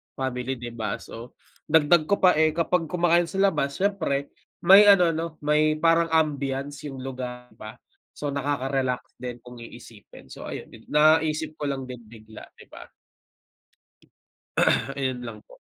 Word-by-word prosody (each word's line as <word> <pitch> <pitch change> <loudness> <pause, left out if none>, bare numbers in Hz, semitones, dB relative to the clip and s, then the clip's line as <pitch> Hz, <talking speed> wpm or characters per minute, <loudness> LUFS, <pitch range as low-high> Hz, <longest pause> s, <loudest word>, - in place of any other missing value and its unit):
family, 130 0 -3
'di 120 -1 -8
ba? 115 -1 -3
So, 120 +3 -11 0.3
dagdag 155 0 +4
ko 200 - +3
pa 180 - +7
eh, 155 -1 +2
kapag 170 0 0
kumakain 175 0 +2
sa 180 +4 -7
labas 150 -7 +1
siyempre, 170 -8 -1 0.3
may 195 +4 +8
ano, 180 -4 +6
'no, 165 +1 -2 0.2
may 150 +1 +2
parang 165 +1 +3
ambiance 145 -2 -1
yung 135 -2 -8
lugar, 125 -2 -7
di 110 - -24
ba? 110 - -9 0.4
So, 145 -1 -3
nakaka-relax 135 -2 -2
din 125 -1 -6
kung 125 -1 -12
iisipin. 115 -2 -14
So, - - -9
ayun, - - -8
nag 115 - -15
naisip 155 0 +3
ko 145 -2 -4
lang 135 -1 -3
din 125 -2 -9
bigla, 110 -1 -13 0.2
'di - - -15
ba? - - -11 2.1
Ayun 130 -2 -2
lang 110 -2 -8
po. - - -19
140 Hz, 155 wpm, -25 LUFS, 125-160 Hz, 2.1 s, may